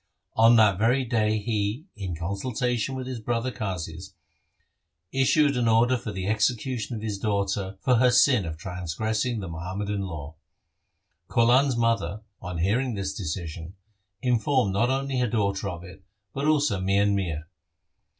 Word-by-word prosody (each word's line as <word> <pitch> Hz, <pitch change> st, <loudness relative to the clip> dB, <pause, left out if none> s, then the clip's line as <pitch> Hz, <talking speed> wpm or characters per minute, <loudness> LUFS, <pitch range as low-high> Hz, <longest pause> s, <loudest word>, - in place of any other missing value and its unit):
On 115 Hz, +1 st, +6 dB
that 105 Hz, -5 st, +5 dB
very 125 Hz, +4 st, +2 dB
day 110 Hz, -3 st, +1 dB
he, 110 Hz, +5 st, -2 dB
in 95 Hz, -5 st, -4 dB
consultation 120 Hz, -, -2 dB
with 130 Hz, -1 st, -4 dB
his 130 Hz, -2 st, -5 dB
brother 120 Hz, +3 st, -1 dB
Qazis, 95 Hz, -3 st, -5 dB, 1.0 s
issued 140 Hz, +2 st, +3 dB
an 120 Hz, -2 st, +1 dB
order 115 Hz, +3 st, +4 dB
for 115 Hz, -3 st, -5 dB
the 95 Hz, -2 st, -4 dB
execution 110 Hz, +3 st, 0 dB
of 110 Hz, -, -6 dB
his 105 Hz, -3 st, -3 dB
daughter 100 Hz, -2 st, -1 dB
for 125 Hz, -2 st, +3 dB
her 125 Hz, +2 st, +5 dB
sin 125 Hz, -2 st, +5 dB
of 80 Hz, -1 st, -5 dB
transgressing 100 Hz, +6 st, -2 dB
the 95 Hz, -, -5 dB
Muhammadan 95 Hz, +5 st, -4 dB
law. 80 Hz, -5 st, -6 dB, 0.9 s
Kaulan' 120 Hz, +4 st, +4 dB
s 130 Hz, -, 0 dB
mother, 115 Hz, -2 st, 0 dB, 0.2 s
on 90 Hz, -2 st, -5 dB
hearing 115 Hz, +8 st, +1 dB
this 95 Hz, -1 st, -3 dB
decision, 85 Hz, -1 st, -5 dB, 0.5 s
informed 125 Hz, -3 st, +2 dB
not 115 Hz, +5 st, +2 dB
only 135 Hz, 0 st, -1 dB
her 125 Hz, -, +2 dB
daughter 100 Hz, -3 st, 0 dB
of 85 Hz, 0 st, -7 dB
it, 95 Hz, +1 st, -12 dB, 0.3 s
but 140 Hz, +2 st, -1 dB
also 145 Hz, -10 st, +2 dB
Mian 100 Hz, +2 st, +2 dB
Mir. 85 Hz, -6 st, -2 dB
105 Hz, 150 wpm, -26 LUFS, 95-125 Hz, 1.0 s, On